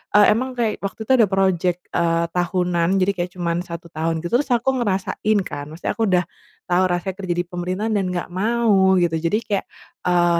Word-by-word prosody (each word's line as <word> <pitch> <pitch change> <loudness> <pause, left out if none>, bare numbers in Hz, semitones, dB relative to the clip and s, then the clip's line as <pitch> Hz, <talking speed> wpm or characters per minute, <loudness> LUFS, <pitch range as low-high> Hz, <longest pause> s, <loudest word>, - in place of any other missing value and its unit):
eee, 210 - +8
emang 260 +2 -2
kayak 225 -3 0
waktu 195 +2 -4
itu - - +1
ada 215 - +6
project, 185 -2 +1 0.2
eee, 170 0 +2
tahunan, 175 -1 +1
jadi 195 +2 +3
kayak 175 0 -3
cuman 170 -1 0
1 170 -1 -8
tahun 160 +1 -1
gitu, 175 +7 -1
terus 280 -3 -3
aku 240 +3 0
ngerasain 205 +2 0
kan, 145 -1 -6
maksudnya 165 - -3
aku 225 - 0
udah 180 0 +3 0.4
tahu 180 +1 +3
rasanya 180 +2 -2
kerja 180 -3 -1
di - - +1
pemerintahan 185 +5 -2
dan 195 -2 +1
gak 175 -1 -3
mau, 200 -2 +3
gitu. 170 -2 +1
Jadi 170 +6 +1
kayak, 200 -2 -1 0.4
eee, 175 -1 +3
180 Hz, 195 wpm, -21 LUFS, 175-200 Hz, 0.4 s, eee